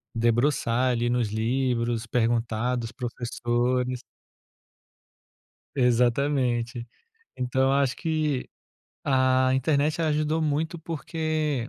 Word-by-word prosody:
debruçar 120 +1 +2
ali 120 0 0
nos 120 -2 +1
livros, 115 0 0
perguntar 115 +1 0
dos 115 0 -5
professores. 125 +1 -1 1.8
Exatamente. 125 -1 +1 0.5
Então, 130 +1 0
eu 135 - +3
acho 140 -1 +2
que 155 -5 -1 0.6
a 130 -1 +3
internet, 145 +4 +1
ela 160 -1 +1
ajudou 155 +1 0
muito 155 +3 -1
porque 155 -5 -2
125 Hz, 90 wpm, -26 LUFS, 120-145 Hz, 1.8 s, eu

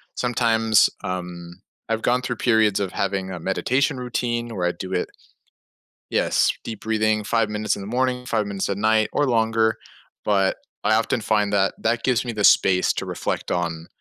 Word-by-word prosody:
Sometimes, 115 -2 +3
um, 90 -1 -6 0.3
I've 115 0 0
gone 125 +1 +2
through 125 -1 -3
periods 110 -4 +3
of 100 -2 -2
having 95 -1 -2
a 90 - -5
meditation 125 +10 0
routine 120 -1 -2
where 90 -2 0
I 90 - +1
do 95 0 -7
it 90 - -1 1.0
Yes, - - +2
deep 110 -3 -7
breathing, 110 -1 +1
5 115 +2 +1
minutes 105 0 -1
in - - -8
the 95 - -7
morning, 125 +2 -1
5 110 -2 0
minutes 100 -1 -3
at 100 - -1
night, 110 0 +2
or 145 -1 +2
longer. 110 -1 +2 0.5
But 100 -2 +2 0.3
I - - +3
often 115 +2 0
find 105 -1 +1
that 95 -1 +2
that 115 +1 0
gives 125 -2 +2
me 120 - -3
the 105 -1 -2
space 90 -2 +4
to - - -4
reflect - - -3
on 85 -2 -2
110 Hz, 180 wpm, -23 LUFS, 95-115 Hz, 1.0 s, space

